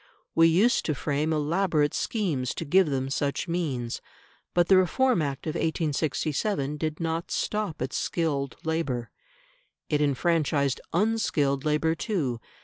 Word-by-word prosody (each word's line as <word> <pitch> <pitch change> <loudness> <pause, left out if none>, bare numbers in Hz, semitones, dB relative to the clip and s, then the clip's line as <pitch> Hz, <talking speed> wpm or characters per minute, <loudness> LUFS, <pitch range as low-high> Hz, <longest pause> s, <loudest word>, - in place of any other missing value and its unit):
We 165 0 +6
used 195 +9 +3
to 155 - 0
frame 150 +3 -1
elaborate 155 0 +1
schemes 160 - -1
to 165 - -4
give 185 +4 +4
them 135 -1 -2
such 140 +4 -1
means. 140 -9 -2 0.5
But 175 -1 +4
the 195 - +6
Reform 215 +3 +3
Act 140 -2 -3
of 155 - -2
1867 155 0 -1
did 155 0 -3
not 165 0 -2
stop 210 -10 -2
at 130 - -4
skilled 145 -5 -1
labour; 150 -7 -2 0.8
it 150 -1 +2
enfranchised 145 -1 +1
unskilled 165 -9 +1
labour 155 +2 +2
too. 155 - -2
155 Hz, 135 wpm, -27 LUFS, 140-170 Hz, 0.8 s, We